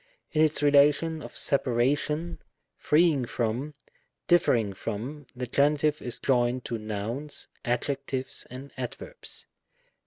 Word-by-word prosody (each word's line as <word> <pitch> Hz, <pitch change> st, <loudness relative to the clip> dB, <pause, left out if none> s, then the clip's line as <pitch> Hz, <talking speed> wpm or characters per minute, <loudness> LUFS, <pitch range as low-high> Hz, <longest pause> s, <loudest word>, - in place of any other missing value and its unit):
In 155 Hz, -, +2 dB
its 155 Hz, -1 st, +3 dB
relation 145 Hz, +3 st, +4 dB
of -, -, -9 dB
separation, 145 Hz, +6 st, +1 dB, 0.4 s
freeing 150 Hz, -4 st, +3 dB
from, 120 Hz, +6 st, -2 dB, 0.5 s
differ 175 Hz, -6 st, +5 dB
ing 105 Hz, -4 st, 0 dB
from, 120 Hz, +9 st, -5 dB
the 125 Hz, 0 st, -3 dB
Genitive 150 Hz, +3 st, +2 dB
is 120 Hz, -, -5 dB
joined 125 Hz, -1 st, +1 dB
to 115 Hz, -1 st, -3 dB
nouns, 110 Hz, +7 st, -4 dB, 0.2 s
adjectives, 130 Hz, +1 st, -2 dB
and 130 Hz, +2 st, -9 dB
adverbs. 130 Hz, -, -7 dB
140 Hz, 115 wpm, -28 LUFS, 120-150 Hz, 0.5 s, differ